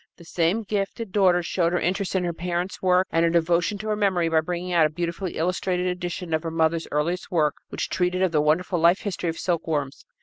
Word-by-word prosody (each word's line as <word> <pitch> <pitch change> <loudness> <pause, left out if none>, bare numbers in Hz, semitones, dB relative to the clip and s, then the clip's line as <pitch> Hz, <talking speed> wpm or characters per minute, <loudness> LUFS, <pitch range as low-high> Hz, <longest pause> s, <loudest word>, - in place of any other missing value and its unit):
The 170 - -14
same 175 +7 0
gifted 200 +1 -3
daughter 180 -3 +3
showed 170 0 0
her 175 - +2
interest 190 +2 -1
in 185 - +1
her 175 -1 -1
parent's 175 +2 -3
work 185 0 +3
and 165 - +2
her 170 - +4
devotion 170 +3 +1
to 215 +2 -7
her 210 - +1
memory 190 -5 +1
by 160 -1 +3
bringing 180 +2 -4
out 165 -3 +5
a - - -10
beautifully 170 +3 -4
illustrated 180 +2 -1
edition 180 -1 -3
of 160 - +1
her 165 - -4
mother's 160 0 0
earliest 165 +5 -1
work 155 -6 +2 0.2
which - - -3
treated 180 +1 0
of 185 - +2
the 155 -2 +2
wonderful 170 +4 +1
life 170 +3 +4
history 180 -4 -3
of 165 - -4
silkworms. 155 -6 -2
175 Hz, 225 wpm, -24 LUFS, 165-185 Hz, 0.2 s, out